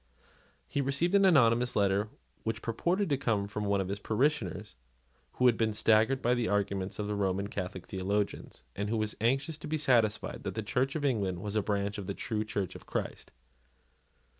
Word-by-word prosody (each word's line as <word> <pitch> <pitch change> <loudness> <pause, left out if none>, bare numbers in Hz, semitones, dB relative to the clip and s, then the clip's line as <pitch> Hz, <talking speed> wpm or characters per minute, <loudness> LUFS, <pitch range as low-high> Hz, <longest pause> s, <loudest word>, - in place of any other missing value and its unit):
He 140 - -1
received 140 +7 0
an 200 -1 +6
anonymous 125 -7 +4
letter 100 +1 +2 0.3
which 110 0 -3
purported 175 - 0
to 140 - +2
come 105 -6 0
from 105 0 -4
one 100 0 +2
of 95 - -1
his 100 +1 -3
parishioners 115 - -1 0.6
who 125 - 0
had 120 -2 +5
been 110 -1 +1
staggered 110 +5 +3
by 120 - +3
the 120 -2 0
arguments 100 -2 -1
of 105 - -3
Roman 100 -1 -1
Catholic 95 -3 -5
theologians, 100 +2 -3
and 100 +1 -2
who 115 - 0
was 110 0 -1
anxious 135 +7 +1
to - - -7
be 155 +1 -1
satisfied 115 -7 +1
that - - -5
the 110 - -2
Church 130 +7 0
of 150 -2 -1
England 100 -9 0
was 105 +2 -4
a 105 - +3
branch 100 0 -1
of 95 - -6
the 100 - -3
true 110 -1 -2
Church 100 -4 -3
of - - -12
Christ. - - -4
110 Hz, 190 wpm, -30 LUFS, 100-125 Hz, 0.6 s, an